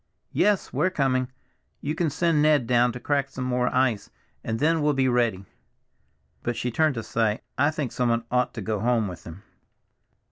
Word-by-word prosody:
"Yes! 210 -1 +1
we're 150 +8 +2
coming. 130 -6 0 0.5
You 150 - -3
can 165 -1 0
send 165 +1 +1
Ned 150 -4 +4
down 120 0 +3
now - - -5
to 125 - -7
crack 140 0 0
some 130 -1 -6
more 125 -1 0
ice, 125 -5 +1 0.3
and 110 - -2
then 160 +4 +2
we'll 150 0 +2
be 135 -1 +2
ready." 120 -6 +1 1.0
But 120 - -2
she 125 - -2
turned 155 +3 +2
to 115 - -4
say, 110 -1 0
"I 145 - +3
think 150 -5 -3
someone 120 -2 0
ought 125 0 +1
to - - -4
go 110 -2 -2
home 115 -1 +1
with 90 -2 -9
him." 85 +5 -10
125 Hz, 190 wpm, -25 LUFS, 115-145 Hz, 1.0 s, Ned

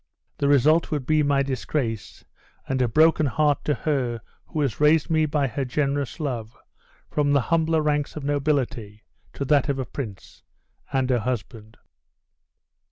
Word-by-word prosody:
The 140 - +1
result 145 +4 +4
would 145 -4 -2
be 155 +2 +3
my 140 -1 +2
disgrace, 130 -4 -3 0.4
and 130 -1 -1
a 125 - +3
broken 155 +4 +4
heart 150 +2 +1
to 150 - +1
her 125 -6 -1 0.3
who 155 - -3
has 135 -7 -1
raised 150 +2 +3
me 155 -1 +3
by 145 -1 0
her 135 +2 -2
generous 140 +2 -2
love 120 -7 -4 0.5
from 145 -1 +1
the 140 - +4
humbler 160 -1 +2
ranks 150 -1 0
of 155 - -6
nobility 135 -7 -1 0.3
to 140 - -4
that 145 -1 +3
of 140 - 0
a 130 - -2
prince, 110 -9 -8 0.5
and 135 -2 +1
her 125 - +2
husband." 110 -2 -5
140 Hz, 160 wpm, -24 LUFS, 125-150 Hz, 0.5 s, result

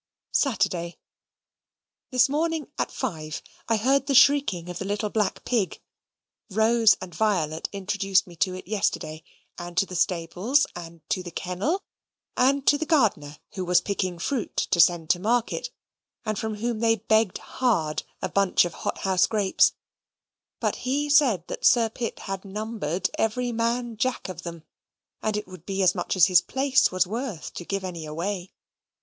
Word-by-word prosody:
Saturday. 195 - 0 1.1
This 250 -2 +4
morning, 315 +1 -1
at - - 0
five, 155 -2 -4 0.3
I 225 - +3
heard 270 +5 +2
the 275 - +1
shrieking 255 -11 +4
of 180 - -6
the 195 - -4
little 205 +1 -2
black 210 -3 -1
pig. 225 -6 0 0.7
Rose 220 +2 +4
and 180 -2 -8
Violet 160 -5 0
introduced 195 -1 +1
me 175 - -13
to 185 0 0
it 185 - -9
yesterday; 180 -6 -1 0.4
and 175 0 -8
to 195 - +4
the 185 - -10
stables, 180 - +1
and 165 -2 -10
to 185 - +1
the 180 - -7
kennel, 185 - -2 0.5
and 270 +2 +2
to 290 - +4
the 315 - -1
gardener, 195 - +1
who 190 - -4
was 180 0 +4
picking 185 -3 -2
fruit 235 +7 -3 0.2
to 180 - +2
send 170 -1 +4
to 175 - +1
market, 235 - 0 0.6
and 215 -2 -2
from 220 -1 -3
whom 230 +1 -2
they 225 0 +3
begged 220 -1 +1
hard 170 -12 0 0.2
a - - +1
bunch 195 -2 +3
of 175 - -5
hot - - -4
house 185 -1 +3
grapes; 205 -4 +3 0.9
but - - -1
he 290 +3 -1
said 250 - +4
that - - -6
Sir 230 -2 +5
Pitt 230 +1 -4
had 195 -1 -5
numbered 205 -4 -3
every 245 +3 0
"Man 235 0 -1
Jack" 250 -2 -1
of 180 -1 -7
them, 170 -2 -8 0.6
and 215 -1 -1
it 210 - -4
would 185 -3 -13
be 195 -1 0
as 185 - +5
much 175 0 -2
as 180 -3 +7
his 180 -2 +5
place 270 0 +2
was 185 0 +2
worth 220 - -5
to - - -6
give 195 +1 -3
any 170 -4 -5
away. 180 +4 -4
200 Hz, 170 wpm, -25 LUFS, 180-235 Hz, 1.1 s, as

